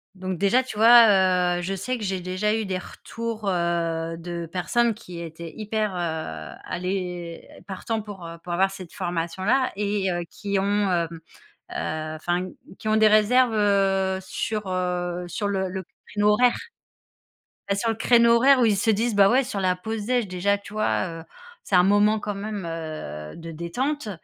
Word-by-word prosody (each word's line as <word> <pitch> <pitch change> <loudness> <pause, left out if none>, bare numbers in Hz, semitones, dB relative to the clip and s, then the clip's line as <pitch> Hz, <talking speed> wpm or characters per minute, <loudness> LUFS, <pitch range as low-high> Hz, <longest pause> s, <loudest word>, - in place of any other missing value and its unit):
Donc 185 -1 -4
déjà, 200 +8 +3
tu 255 -5 -8
vois, 190 -6 +6
heu, - - -3
je 190 +2 -2
sais 250 +7 -3
que 225 - -7
j'ai 190 -1 -2
déjà 185 +4 -1
eu 220 -1 -1
des 190 -1 -2
retours, 225 +3 -5
heu, 170 -2 -1
de 170 0 -5
personnes 190 +8 +1
qui 180 -6 -10
étaient 165 0 -8
hyper, 215 -1 -1
heu, 160 - -4
aller 180 -2 -4 0.2
partants 220 +3 -3
pour, 205 -4 -9
heu, 165 0 -8
pour 175 - -5
avoir 190 +2 +2
cette 185 -3 -10
formation-là 185 +8 -1
et 200 -1 0
heu, 175 0 -2
qui 200 -1 -3
ont, 190 - +1 0.3
hem, 170 -2 +1 0.6
heu, 155 0 -3
enfin, 175 +3 -2 0.3
qui 215 - -4
ont 215 - +3
des 220 0 +5
réserves, 220 +3 +4
heu, 195 -2 +2
sur, 210 +2 -3
heu, 180 -1 -2
sur 205 +4 -3
le 190 -2 -1
le 190 0 -5 0.2
créneau 210 0 +2
horaire. 245 +4 +4 1.1
Bah, 200 - +2
sur 225 +3 -1
le 225 - 0
créneau 235 +1 +5
horaire 265 +3 +5
où 245 - +4
ils 215 -2 +3
se 205 +3 0
disent: 220 +1 +1
«Bah, 200 -1 +6
ouais, 260 +2 +3
sur 200 -4 -3
la 185 -1 +1
pause 220 +2 -4
déj», 245 -4 +1
déjà, 185 +3 +1
tu 200 +1 -13
vois? 185 -5 -1
Heu, - - -12 0.4
c'est 195 - 0
un 180 - +7
moment 205 +3 +4
quand 205 -1 -4
même, 205 -1 -5
heu, 155 - -6
de 165 0 -8
détente, 225 - -3
195 Hz, 185 wpm, -24 LUFS, 175-215 Hz, 1.1 s, un